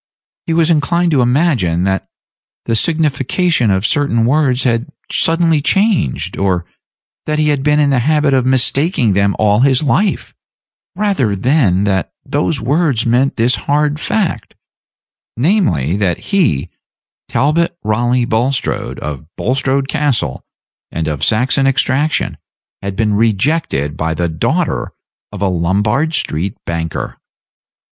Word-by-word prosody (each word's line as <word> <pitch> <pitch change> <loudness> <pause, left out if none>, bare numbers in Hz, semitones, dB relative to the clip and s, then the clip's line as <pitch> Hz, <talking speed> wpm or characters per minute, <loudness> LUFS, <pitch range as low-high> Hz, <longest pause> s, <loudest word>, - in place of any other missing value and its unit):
He 165 - 0
was 165 0 +3
inclined 170 +3 +1
to 140 -4 +3
imagine 120 - +1
that 95 0 -1 0.6
the 115 - 0
signification 155 - +1
of 95 +1 +1
certain 115 -1 +1
words 130 -1 +2
had 120 +2 0 0.2
suddenly 165 -2 +2
changed, 195 - 0
or 95 -3 0 0.6
that 155 0 0
he 150 0 +2
had 145 -2 0
been 150 +1 +2
in 145 -1 +3
the 130 - +2
habit 150 +2 +2
of 130 -2 +3
mistaking 130 - +1
them 100 +1 +1
all 105 0 +2
his 130 +2 +3
life, 190 +8 0 0.6
rather 190 - 0
than 100 - +2
that 95 -2 -1
those 135 - -1
words 140 -1 0
meant 125 +4 +2
this 120 +2 +2 0.2
hard 150 +1 +1
fact, 170 - -2 0.8
namely, 110 - +1
that 95 -4 0
he, 165 - +1 0.6
Talbot 165 +5 +1
Raleigh 120 +3 +1
Bulstrode, 120 +4 -1
of 75 0 -6
Bulstrode 135 +1 0
Castle, 140 - -1 0.5
and 80 -1 -3
of 75 -3 -3
Saxon 130 +5 +2
extraction, 135 +3 0 0.4
had 100 -1 -4
been 105 0 0
rejected 105 - 0
by 80 +1 -1
the 85 +2 -1
daughter 80 -1 -1 0.4
of 100 -1 -5
a - - +2
Lombard 105 - 0
street 90 - -2
banker. 80 -1 -4
125 Hz, 130 wpm, -15 LUFS, 100-150 Hz, 0.8 s, was